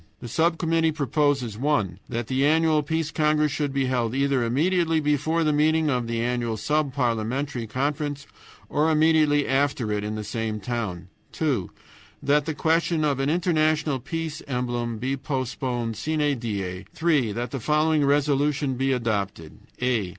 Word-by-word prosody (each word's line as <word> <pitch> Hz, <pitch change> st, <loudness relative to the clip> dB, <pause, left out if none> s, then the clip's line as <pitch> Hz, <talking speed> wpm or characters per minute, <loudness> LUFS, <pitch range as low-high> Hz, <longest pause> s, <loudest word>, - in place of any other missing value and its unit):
The 120 Hz, -, -8 dB
sub 165 Hz, +7 st, +1 dB
committee 165 Hz, -1 st, +2 dB
proposes, 145 Hz, -6 st, 0 dB
(1) 115 Hz, -, 0 dB
that 120 Hz, -1 st, -2 dB
the 130 Hz, +3 st, 0 dB
annual 155 Hz, +1 st, +3 dB
Peace 160 Hz, +1 st, -2 dB
Congress 150 Hz, -1 st, +2 dB
should 145 Hz, 0 st, -1 dB
be 135 Hz, 0 st, 0 dB
held 125 Hz, -2 st, 0 dB
either 140 Hz, -2 st, +2 dB
immediately 165 Hz, +6 st, +2 dB
before 155 Hz, +2 st, +1 dB
the 155 Hz, -1 st, +2 dB
meeting 155 Hz, +1 st, +2 dB
of 125 Hz, -2 st, -1 dB
the 115 Hz, 0 st, -1 dB
annual 120 Hz, -2 st, -1 dB
Sub 150 Hz, +5 st, 0 dB
parliamentary 125 Hz, +1 st, -1 dB
Conference, 145 Hz, +3 st, -2 dB, 0.4 s
or 155 Hz, +2 st, +1 dB
immediately 155 Hz, -2 st, +3 dB
after 135 Hz, -4 st, +1 dB
it 105 Hz, 0 st, -1 dB
in 105 Hz, +1 st, -3 dB
the 110 Hz, -, -4 dB
same 110 Hz, 0 st, -3 dB
town; 95 Hz, -5 st, -4 dB, 0.2 s
(2) 135 Hz, -, -1 dB, 0.5 s
that 145 Hz, 0 st, +3 dB
the 160 Hz, -, -2 dB
question 165 Hz, 0 st, +1 dB
of 140 Hz, -3 st, 0 dB
an 135 Hz, +1 st, +1 dB
international 155 Hz, -4 st, +1 dB
peace 160 Hz, +3 st, -4 dB
emblem 120 Hz, -3 st, -2 dB
be 130 Hz, +4 st, -1 dB
postponed 125 Hz, -3 st, -3 dB
SINE 150 Hz, -1 st, 0 dB
DIE; 100 Hz, -5 st, -4 dB
(3) 150 Hz, -9 st, +1 dB
that 120 Hz, +2 st, -4 dB
the 135 Hz, -, -3 dB
following 150 Hz, +3 st, +2 dB
resolutions 140 Hz, -1 st, +1 dB
be 135 Hz, 0 st, +1 dB
adopted: 100 Hz, -9 st, -2 dB, 0.3 s
"a. 115 Hz, -7 st, +1 dB
140 Hz, 160 wpm, -25 LUFS, 120-155 Hz, 0.5 s, annual